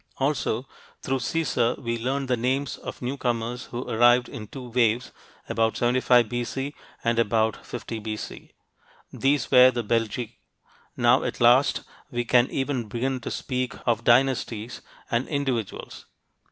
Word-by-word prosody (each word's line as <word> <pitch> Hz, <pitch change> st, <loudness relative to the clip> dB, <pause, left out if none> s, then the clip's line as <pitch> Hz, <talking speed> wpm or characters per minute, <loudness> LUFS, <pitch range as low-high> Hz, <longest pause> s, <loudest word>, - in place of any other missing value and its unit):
Also, 135 Hz, -3 st, -1 dB, 0.4 s
through 135 Hz, 0 st, 0 dB
Caesar, 125 Hz, -3 st, 0 dB
we 115 Hz, -1 st, -3 dB
learn 135 Hz, +4 st, -1 dB
the 130 Hz, -1 st, +1 dB
names 130 Hz, +4 st, -1 dB
of -, -, -8 dB
newcomers 125 Hz, -2 st, -2 dB
who 120 Hz, +1 st, -6 dB
arrived 120 Hz, +2 st, +4 dB
in 105 Hz, -2 st, -8 dB
two 125 Hz, +1 st, -9 dB
waves, 120 Hz, 0 st, +1 dB, 0.4 s
about 115 Hz, 0 st, 0 dB
75 120 Hz, -1 st, +3 dB
B.C. 120 Hz, +5 st, -3 dB, 0.3 s
and 115 Hz, 0 st, +1 dB
about 110 Hz, -1 st, +1 dB
50 115 Hz, -1 st, -6 dB
B.C. 110 Hz, 0 st, -7 dB, 0.6 s
These 140 Hz, +1 st, +1 dB
were 125 Hz, -1 st, +8 dB
the 120 Hz, -2 st, -2 dB
Belgae. 115 Hz, +1 st, -1 dB, 0.6 s
Now, -, -, +4 dB
at -, -, -4 dB
last, 120 Hz, +4 st, +5 dB, 0.3 s
we 120 Hz, -1 st, -2 dB
can 120 Hz, +1 st, +4 dB
even 135 Hz, -4 st, -2 dB
begin 130 Hz, +4 st, -2 dB
to 115 Hz, -, -6 dB
speak 130 Hz, -1 st, -3 dB
of 115 Hz, -2 st, +1 dB
dynasties 120 Hz, -2 st, +1 dB, 0.3 s
and 120 Hz, +3 st, 0 dB
individuals. 135 Hz, -8 st, -3 dB
120 Hz, 140 wpm, -25 LUFS, 115-130 Hz, 0.6 s, were